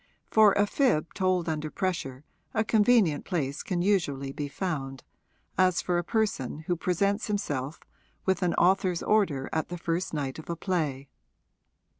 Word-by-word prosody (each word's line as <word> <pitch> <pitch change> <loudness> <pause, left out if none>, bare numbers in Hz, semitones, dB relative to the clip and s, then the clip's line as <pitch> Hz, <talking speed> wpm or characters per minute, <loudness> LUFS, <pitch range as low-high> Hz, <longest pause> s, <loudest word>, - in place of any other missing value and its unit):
For 215 -2 +6
a 205 - +3
fib 205 - +1
told 185 -3 +1
under 155 -1 -2
pressure 160 -8 -3 0.3
a 220 - +3
convenient 215 -7 +3
place 145 -6 -2
can 175 -2 -2
usually 145 -9 0
be 145 +1 -4
found, 140 -5 -4 0.6
as 185 -1 +4
for 175 -1 0
a - - -2
person 200 - -1
who 175 +3 -1
presents 200 +6 0
himself 150 -9 -2 0.5
with 190 -1 +1
an 180 -2 +1
author's 185 -1 +2
order 170 -11 +2
at 160 - -1
the 175 - -5
first 170 +1 -2
night 140 -2 -3
of 155 - -11
a 170 - -1
play. 155 -7 -2
175 Hz, 155 wpm, -28 LUFS, 150-195 Hz, 0.6 s, For